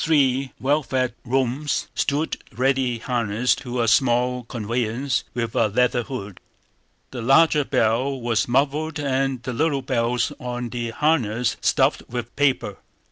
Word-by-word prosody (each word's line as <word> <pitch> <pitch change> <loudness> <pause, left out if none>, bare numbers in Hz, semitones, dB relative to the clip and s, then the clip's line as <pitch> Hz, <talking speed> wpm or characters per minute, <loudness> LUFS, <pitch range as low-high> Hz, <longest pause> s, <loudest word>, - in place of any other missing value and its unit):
Three 135 -4 +2
well 145 +3 +2
fed 130 -2 -1
roans 130 +3 -1
stood 145 +3 -1
ready 130 +1 +1
harnessed 120 -1 0
to 125 -2 -2
a - - 0
small 125 +1 +2
conveyance 115 +3 -2
with 115 -2 -2
a 115 - +3
leather 120 +3 +2
hood. 105 -6 -7 0.7
The 125 - -5
larger 145 +5 +4
bell 130 +3 +1
was 115 -4 0
muffled 145 +5 0
and 135 -3 -1
the 125 +2 -4
little 140 +1 0
bells 120 -2 0
on 125 -1 -4
the 120 -1 -3
harness 120 -4 +1
stuffed - - +2
with 120 -1 -5
paper. 135 -8 +1
125 Hz, 135 wpm, -23 LUFS, 115-135 Hz, 0.7 s, larger